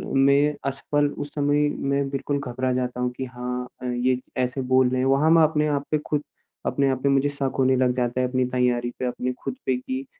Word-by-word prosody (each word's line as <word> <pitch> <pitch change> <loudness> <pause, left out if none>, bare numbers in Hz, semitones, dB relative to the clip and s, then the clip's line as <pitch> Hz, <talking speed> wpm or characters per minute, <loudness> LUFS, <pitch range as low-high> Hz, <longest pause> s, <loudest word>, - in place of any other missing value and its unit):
मैं 140 +2 +4 0.2
असफल 145 +2 0
उस 145 - -6
समय 145 0 +2 0.2
मैं 140 0 +1
बिल्कुल 140 +1 -2
घबरा 130 -1 -2
जाता 125 -1 -2
हूँ 125 0 0
कि 130 - -3
हाँ 125 0 -4 0.2
अ, - - -6
ये 125 +1 +1 0.3
ऐसे 125 +2 -2
बोल 130 0 +3
रहे 130 0 -1
हैं। - - +1
वहाँ 140 +4 +3
मैं 165 -1 +7
अपने 150 -1 +2
आप 145 -1 -1
पे 155 - +3
खुद 150 -1 0 0.4
अपने 140 -1 +1
आप 130 -1 -1
पे 140 - +3
मुझे 140 +1 +3
शक 140 -2 -2
होने 130 0 +4
लग 130 -1 +3
जाता 125 0 0
है 125 - +1
अपनी 130 0 0
तैयारी 125 -1 +1
पे, 130 - -1
अपने 125 +1 -2
खुद - - -3
पे 130 - +2
कि 130 +1 -5
130 Hz, 230 wpm, -24 LUFS, 125-140 Hz, 0.4 s, मैं